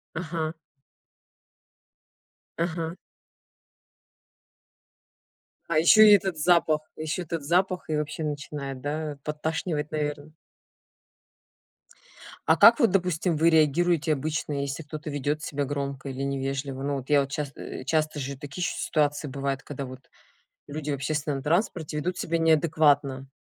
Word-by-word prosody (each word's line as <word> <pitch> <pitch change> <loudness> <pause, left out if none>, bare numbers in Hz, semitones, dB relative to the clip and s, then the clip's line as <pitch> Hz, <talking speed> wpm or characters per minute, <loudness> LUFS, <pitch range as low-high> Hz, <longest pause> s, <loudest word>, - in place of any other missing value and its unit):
Ага. 160 -1 -3 2.1
Ага. 165 0 -2 2.7
А 165 - +1
еще 215 +6 +8
и - - +9
этот 190 -4 -1
запах, 155 -1 +3 0.2
еще 155 +3 -3
этот 165 -3 -4
запах 180 +3 +1
и 155 - 0
вообще 150 +1 -3
начинает, 145 -3 -5
да, 150 0 -3
подташнивать, 155 0 -2
наверно? 150 0 -3 2.1
А - - +5
как - - +8
вот, 230 -7 +4
допустим, 180 -3 +1
вы 165 +2 +4
реагируете 160 +1 +3
обычно, 150 0 -2
если 140 +3 -4
кто-то 150 0 -7
ведет 145 +1 -2
себя 145 -1 -2
громко 140 -1 -4
или 135 +1 -4
невежливо? 135 0 -3
Ну 140 0 -1
вот 130 +2 -8
я, 145 -1 +5
вот 135 0 -4
часто, 140 -1 -4
э, - - -7
часто 155 0 0
же 135 0 -4
такие 145 +5 -7
еще - - -1
ситуации 145 -1 0
бывают, 140 0 -3
когда 140 -1 -6
вот 130 +1 -11 0.6
люди 150 0 -5
в - - +1
общественном 140 0 -2
транспорте 160 -1 0
ведут 175 +4 -2
себя 165 0 -1
неадекватно. 150 -4 +2
150 Hz, 130 wpm, -26 LUFS, 140-160 Hz, 2.7 s, и